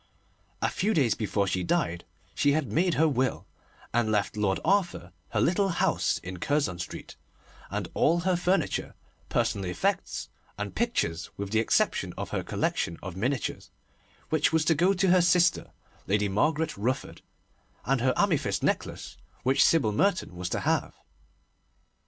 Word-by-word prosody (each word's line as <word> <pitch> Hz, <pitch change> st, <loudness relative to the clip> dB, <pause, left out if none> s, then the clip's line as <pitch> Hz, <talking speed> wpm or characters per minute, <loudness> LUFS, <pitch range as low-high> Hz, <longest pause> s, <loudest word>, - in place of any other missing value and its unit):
A -, -, +3 dB
few 210 Hz, +3 st, 0 dB
days 130 Hz, -7 st, +3 dB
before 105 Hz, -2 st, -1 dB
she 95 Hz, -1 st, -1 dB
died 85 Hz, -1 st, -1 dB, 0.3 s
she 145 Hz, -, +2 dB
had 155 Hz, -4 st, -1 dB
made 175 Hz, +1 st, +2 dB
her 160 Hz, +2 st, +4 dB
will, 130 Hz, -4 st, 0 dB, 0.5 s
and 115 Hz, -2 st, +2 dB
left 105 Hz, -1 st, 0 dB
Lord 100 Hz, -2 st, 0 dB
Arthur 185 Hz, -, +1 dB, 0.2 s
her -, -, -1 dB
little 195 Hz, +3 st, +2 dB
house 170 Hz, -, +1 dB
in 90 Hz, 0 st, -6 dB
Curzon 140 Hz, -, 0 dB
Street, 85 Hz, -, -7 dB, 0.5 s
and -, -, -3 dB
all 170 Hz, +3 st, +2 dB
her 185 Hz, +1 st, +1 dB
furniture, 180 Hz, +2 st, 0 dB, 0.3 s
personal 115 Hz, -6 st, 0 dB
effects, 90 Hz, -2 st, -2 dB, 0.3 s
and 105 Hz, 0 st, -4 dB
pictures, 85 Hz, -, -1 dB
with 100 Hz, -1 st, -5 dB
the 110 Hz, -, +3 dB
exception 115 Hz, -, +1 dB
of -, -, -5 dB
her -, -, -1 dB
collection 85 Hz, -, -2 dB
of 90 Hz, -1 st, -6 dB
miniatures, 125 Hz, +5 st, -2 dB, 0.6 s
which 155 Hz, -1 st, +2 dB
was 160 Hz, -1 st, +2 dB
to 165 Hz, -, +4 dB
go 175 Hz, +6 st, +3 dB
to 190 Hz, 0 st, +1 dB
her 185 Hz, 0 st, +6 dB
sister, 175 Hz, 0 st, +3 dB, 0.4 s
Lady 105 Hz, +1 st, +2 dB
Margaret 150 Hz, +10 st, 0 dB
Rufford, 125 Hz, +6 st, -2 dB, 0.6 s
and 135 Hz, -2 st, +1 dB
her 130 Hz, 0 st, +2 dB
amethyst 145 Hz, -, +1 dB
necklace, -, -, -2 dB, 0.3 s
which 135 Hz, +2 st, +4 dB
Sybil 145 Hz, -10 st, +3 dB
Merton 180 Hz, -, 0 dB
was 90 Hz, 0 st, -4 dB
to -, -, -2 dB
have. -, -, 0 dB
130 Hz, 155 wpm, -28 LUFS, 100-170 Hz, 0.6 s, her